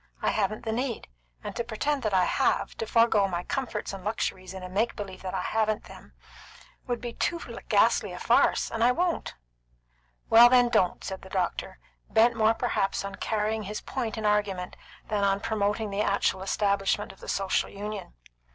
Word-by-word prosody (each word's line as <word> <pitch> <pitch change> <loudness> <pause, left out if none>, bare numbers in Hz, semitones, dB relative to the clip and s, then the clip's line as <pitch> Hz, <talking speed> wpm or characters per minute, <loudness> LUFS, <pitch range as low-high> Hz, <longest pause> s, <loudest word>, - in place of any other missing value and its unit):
I - - +1
haven't 215 +1 -1
the 220 - -1
need, 245 - -3 0.3
and - - -6
to 235 - -1
pretend 270 +5 -1
that 215 - -1
I 185 -2 +4
have, - - +1
to 225 - -3
forego 225 -3 +4
my 175 -2 -3
comforts 235 -6 -3
and 195 -1 -7
luxuries 190 -3 -3
in 190 -1 -8
a - - -5
make 205 +6 0
believe 195 -3 -7
that 190 0 -4
I 185 - -1
haven't 215 -1 0
them, - - -14 0.7
would 245 -1 -1
be 240 0 -5
too 340 +7 -1 0.3
ghastly - - +3
a - - -7
farce, - - +2
and 225 0 0
I 245 +1 +5
won't." 350 +3 -1 0.9
"Well, 235 +2 +8
then, 245 -1 +5
don't," 180 -6 +1
said 190 0 -5
the 190 - -12
doctor, 185 - -2 0.3
bent 230 +2 +4
more 220 0 +3
perhaps 195 -3 -1
on 200 - -5
carrying 220 0 -1
his 210 +1 -5
point 230 -5 -4
in 220 - -3
argument 205 -3 0 0.3
than 210 -2 0
on 195 0 +2
promoting 210 0 -1
the 200 +1 -1
actual 200 -2 +1
establishment 200 +1 0
of 195 - -18
the - - -9
Social 195 -1 0
Union. 205 - -7
210 Hz, 190 wpm, -27 LUFS, 195-230 Hz, 0.9 s, Well